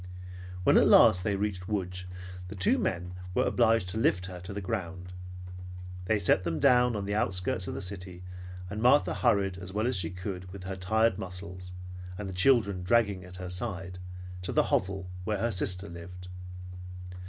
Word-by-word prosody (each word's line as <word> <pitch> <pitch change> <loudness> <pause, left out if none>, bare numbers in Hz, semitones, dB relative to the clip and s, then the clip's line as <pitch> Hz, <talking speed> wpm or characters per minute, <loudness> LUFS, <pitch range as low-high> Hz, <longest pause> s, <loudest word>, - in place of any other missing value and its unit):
When - - +6
at - - +6
last 90 0 +7
they 100 -1 +1
reached 100 -2 -2
Lodz, 90 -3 -2 0.4
the 105 - -7
two 95 -1 +2
men 90 0 -1 0.2
were - - +3
obliged 115 -5 +3
to 110 - -2
lift 95 -5 +2
her 90 -1 -7
to 90 +3 -5
the 100 - -3
ground. 90 -3 -4 0.9
They 110 +3 +3
set 90 -1 +3
them 80 -3 -1
down 125 +2 +5
on 100 -1 -2
the 100 - -2
outskirts 90 -2 +1
of - - -3
the 100 - -4
city 90 -1 -5 0.4
and 105 +3 -4
Martha 130 +5 +5
hurried, 100 -6 +2
as 95 +1 -7
well 105 +2 +1
as 125 - +1
she 90 -3 0
could 90 0 -6
with 95 -1 -8
her 95 +1 -4
tired 110 +3 +2
muscles, 90 0 -6 0.4
and 105 - -4
the 95 - -5
children 100 -2 +4
dragging 100 -1 +2
at 90 0 -11
her 90 0 -5
side, 95 -2 -4 0.4
to 90 - -3
the - - +3
hovel 95 0 +1 0.2
where 105 +2 0
her 115 +4 0
sister 95 0 0
lived. 90 +2 -9
95 Hz, 185 wpm, -30 LUFS, 90-105 Hz, 0.9 s, last